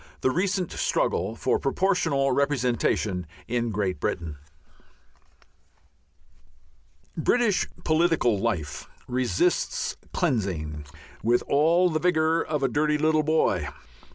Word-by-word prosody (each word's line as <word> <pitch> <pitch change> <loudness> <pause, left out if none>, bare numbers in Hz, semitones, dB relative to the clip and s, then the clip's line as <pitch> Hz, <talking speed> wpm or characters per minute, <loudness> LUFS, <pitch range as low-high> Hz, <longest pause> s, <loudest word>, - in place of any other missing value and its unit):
X - - -22
THE 130 - +2
RECENT 185 +2 -1
STRUGGLE 95 +6 0
FOR - - 0
PROPORTIONAL 140 -3 +1
REPRESENTATION 120 - 0 0.2
IN 120 0 -1
GREAT 100 -3 -2
BRITAIN 80 -4 -3 2.8
British 215 +4 +2 0.2
political 155 - +2
life 95 -9 -3 0.2
resists 330 - 0
cleansing 90 - -2 0.4
with 120 +2 +2
all 170 +5 +3
the 155 - 0
vigour 160 -1 +2
of 150 -3 -2
a - - +4
dirty 150 +4 +1
little 155 +1 +2
boy. 150 - +1
140 Hz, 100 wpm, -26 LUFS, 110-160 Hz, 2.8 s, a